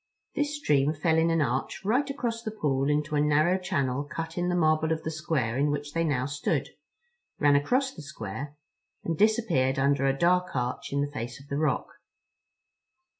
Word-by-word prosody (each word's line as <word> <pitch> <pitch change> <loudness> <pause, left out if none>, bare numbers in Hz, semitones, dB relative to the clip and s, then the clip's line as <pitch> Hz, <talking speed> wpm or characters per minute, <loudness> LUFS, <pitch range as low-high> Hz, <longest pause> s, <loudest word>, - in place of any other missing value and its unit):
This 295 +1 -1
stream 150 - +2
fell 160 +1 +2
in 165 +1 +3
an 165 -2 +2
arch 130 +8 -2
right 255 +7 +2
across 235 -4 -2
the 225 - -4
pool 145 -10 0
into 150 +1 0
a 145 - +3
narrow 155 +5 +3
channel 140 -6 -1
cut 165 +3 -6
in 180 0 0
the 180 - +1
marble 155 -1 +2
of 160 0 -1
the 160 - -3
square 150 -7 -1
in 145 +1 +2
which 145 0 -3
they 165 - +1
now 135 -6 0
stood, 145 +1 -1 0.7
ran 145 -1 +4
across 255 - +1
the 160 - -10
square, 140 - -7 0.5
and 165 - -1
disappeared 205 - +2
under 135 0 +2
a 135 0 +1
dark 180 +2 +2
arch 125 0 -2
in 140 0 0
the 145 0 -2
face 120 -1 -5
of 140 - -16
the 140 - -2
rock. 155 0 +1
150 Hz, 190 wpm, -27 LUFS, 140-175 Hz, 0.7 s, ran